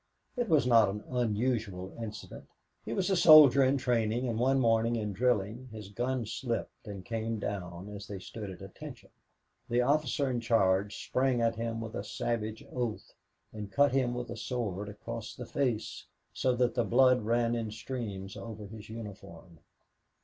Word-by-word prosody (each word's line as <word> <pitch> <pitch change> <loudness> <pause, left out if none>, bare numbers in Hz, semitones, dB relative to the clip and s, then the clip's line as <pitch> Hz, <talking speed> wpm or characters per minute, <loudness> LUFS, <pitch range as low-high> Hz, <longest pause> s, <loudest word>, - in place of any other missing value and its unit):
It 245 -4 -1
was 155 -5 +4
not 115 -4 +6
an 105 +2 -5
unusual 110 -5 -1
incident. 110 -1 -8 0.4
He 110 - -6
was 185 +11 0
a - - +4
soldier 150 -6 +9
in 135 +2 +3
training, 120 -1 0
and 115 -2 -1
one 135 +2 +3
morning 115 -1 +3
in 105 -3 -2
drilling 120 +2 0
his 105 -3 -8
gun 120 +3 -2
slipped 115 0 -4
and 100 -3 -7
came 115 -1 -2
down 95 -3 -5
as 105 0 -8
they 100 - -6
stood 105 +2 -7
at 95 0 -9
"Attention." 95 - -10 0.6
The 120 +1 +3
officer 140 0 +1
in 125 -2 0
charge 100 -3 +1
sprang 130 -1 +1
at 115 -1 +2
him 115 0 -3
with 115 -1 -6
a - - -3
savage 110 0 -3
oath 120 -4 -3 0.4
and 105 -2 -7
cut 140 +3 +4
him 125 -2 +1
with 120 -1 -4
his 115 -2 -6
sword 105 -4 -3
across 115 +2 -7
the 125 - -7
face 125 -5 -2 0.3
so 130 -1 +1
that 125 0 +2
the 120 - +1
blood 130 +1 +4
ran 115 +2 +1
in 115 -2 -2
streams 110 -4 -5
over 110 -2 -7
his 105 +1 -10
uniform. 95 -7 -10
115 Hz, 170 wpm, -31 LUFS, 105-125 Hz, 0.6 s, soldier